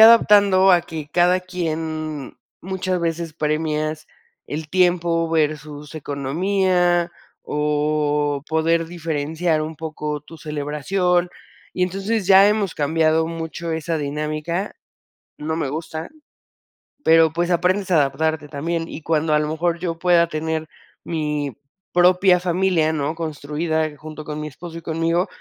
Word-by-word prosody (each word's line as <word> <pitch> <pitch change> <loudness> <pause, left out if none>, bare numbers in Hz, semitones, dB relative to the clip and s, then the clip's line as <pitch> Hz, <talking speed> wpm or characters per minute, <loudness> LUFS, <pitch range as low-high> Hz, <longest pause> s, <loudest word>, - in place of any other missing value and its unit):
adaptando 205 -4 +7
a 175 - +5
que 160 -3 -7
cada 180 +1 +4
quien 160 -5 -4 0.2
muchas 185 -1 -2
veces 165 -1 -2
premias 155 0 -1 0.4
el 155 +1 -5
tiempo 175 -2 +2
versus 150 -1 -2
economía 175 +4 +1 0.3
o 150 -1 0
poder 165 +1 +1
diferenciar 160 -1 -1
un 160 +1 -5
poco 150 -1 -4
tu 160 +3 -14
celebración, 165 +5 0 0.5
y 180 - 0
entonces 195 +3 -2
ya 195 +1 +7
hemos 210 -4 0
cambiado 160 +2 +2
mucho 165 0 -5
esa 160 +1 -2
dinámica, 155 +5 -3 0.6
no 155 +2 -2
me 160 -4 -1
gusta, 160 +2 -5 0.9
pero 160 -1 +5
pues 175 +1 0
aprendes 185 +3 +1
a - - +5
adaptarte 150 +2 0
también, 165 +3 -2
y - - -8
cuando 155 0 +1
a 150 - +4
lo 150 - -1
mejor 170 +2 -1
yo 165 -2 -3
pueda 175 -1 +4
tener 160 0 -3 0.4
mi 150 -4 -2 0.4
propia 180 +1 +5
familia, 180 -3 +1
¿no?, 150 +1 -1
construida 155 0 -2
junto 155 +1 -9
con 150 0 -5
mi 150 - -4
esposo 165 +3 -9
y - - -14
conmigo, 165 +3 0
160 Hz, 130 wpm, -21 LUFS, 155-175 Hz, 0.9 s, adaptando